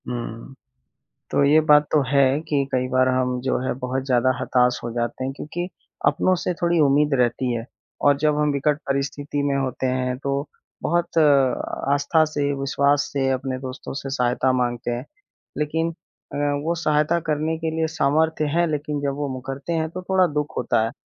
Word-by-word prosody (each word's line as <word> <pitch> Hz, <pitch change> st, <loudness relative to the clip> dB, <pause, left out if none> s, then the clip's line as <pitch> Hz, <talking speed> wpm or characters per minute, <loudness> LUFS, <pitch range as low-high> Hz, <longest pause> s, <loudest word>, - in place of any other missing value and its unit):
हुँ। 120 Hz, +1 st, -6 dB, 0.8 s
तो -, -, +3 dB
ये 145 Hz, +3 st, +6 dB
बात 150 Hz, 0 st, +7 dB
तो 150 Hz, -, +4 dB
है 140 Hz, 0 st, +3 dB
कि 145 Hz, -2 st, +2 dB
कई 130 Hz, -1 st, 0 dB
बार 130 Hz, 0 st, +2 dB
हम 125 Hz, -1 st, 0 dB
जो 130 Hz, +1 st, 0 dB
है 130 Hz, -, -1 dB
बहुत 130 Hz, +1 st, -2 dB
ज़्यादा 130 Hz, -1 st, +2 dB
हताश 125 Hz, -1 st, +2 dB
हो 120 Hz, -, -4 dB
जाते 120 Hz, +2 st, -2 dB
हैं, 130 Hz, -, -2 dB
क्योंकि 175 Hz, +5 st, -5 dB, 0.4 s
अपनों 185 Hz, -, +3 dB
से 180 Hz, -, 0 dB
थोड़ी 170 Hz, -1 st, +2 dB
उम्मीद 145 Hz, 0 st, +3 dB
रहती 125 Hz, +1 st, +1 dB
है। 115 Hz, -1 st, -3 dB, 0.4 s
और 145 Hz, -1 st, +5 dB
जब 150 Hz, 0 st, +1 dB
हम 150 Hz, -1 st, +2 dB
विकट 140 Hz, +1 st, +1 dB
परिस्थिति 140 Hz, +1 st, -2 dB
में 140 Hz, -1 st, +1 dB
होते 130 Hz, -1 st, -2 dB
हैं 125 Hz, 0 st, -1 dB
तो 140 Hz, +2 st, -2 dB, 0.4 s
बहुत 170 Hz, 0 st, 0 dB, 0.8 s
आस्था 145 Hz, +3 st, +3 dB
से, 145 Hz, -2 st, -1 dB
विश्वास 140 Hz, +1 st, +1 dB
से 135 Hz, -2 st, +1 dB
अपने 130 Hz, 0 st, -2 dB
दोस्तों 130 Hz, +1 st, -7 dB
से 135 Hz, -, -6 dB
सहायता 125 Hz, 0 st, +1 dB
माँगते 120 Hz, -1 st, -1 dB
हैं। 120 Hz, +2 st, -4 dB, 0.5 s
लेकिन 160 Hz, +2 st, -1 dB, 0.4 s
अ, -, -, -3 dB, 0.3 s
वो 165 Hz, +2 st, 0 dB
सहायता 155 Hz, 0 st, +1 dB
करने 155 Hz, +1 st, 0 dB
के 160 Hz, 0 st, -2 dB
लिए 160 Hz, 0 st, +1 dB
सामर्थ्य 160 Hz, +1 st, +1 dB
हैं 170 Hz, +1 st, +3 dB
लेकिन 150 Hz, -1 st, -2 dB
जब 140 Hz, -1 st, -1 dB
वो 145 Hz, 0 st, -2 dB
मुकरते 135 Hz, +5 st, -5 dB
हैं 160 Hz, -1 st, 0 dB
तो 185 Hz, +3 st, -6 dB
थोड़ा 190 Hz, -1 st, +4 dB
दुःख 150 Hz, 0 st, -2 dB
होता 120 Hz, -2 st, +1 dB
है। 115 Hz, -, -3 dB
140 Hz, 180 wpm, -23 LUFS, 130-150 Hz, 0.8 s, बात